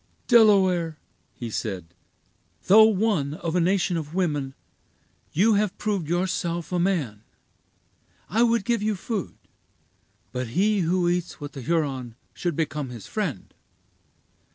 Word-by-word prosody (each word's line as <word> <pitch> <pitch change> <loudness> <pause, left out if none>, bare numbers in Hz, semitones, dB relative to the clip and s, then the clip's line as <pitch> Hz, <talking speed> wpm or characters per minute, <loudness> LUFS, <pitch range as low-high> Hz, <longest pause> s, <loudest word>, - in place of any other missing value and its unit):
"Delaware," 190 -8 +4 0.4
he 120 -2 -6
said, 90 -6 -4 0.7
"though 215 +4 +8
one 195 -9 +1
of 165 +1 -4
a - - +3
nation 175 -1 +1
of 155 0 -6
women, 145 -7 -1 0.8
you 215 +7 +3
have 205 -1 0
proved 200 -7 -2
yourself 175 -1 -1
a 180 - 0
man. 155 - -1 1.1
I 225 - +1
would 235 -3 +3
give 235 -3 +1
you 215 0 0
food; 200 0 -4 0.9
but 125 0 -3
he 210 +2 +3
who 175 0 +1
eats 175 0 -1
with 145 -1 -8
a 135 - -6
Huron 135 -6 -1 0.2
should 175 -3 -2
become 150 -3 -2
his 120 -4 -9
friend. 180 - -4
175 Hz, 130 wpm, -25 LUFS, 145-200 Hz, 1.1 s, though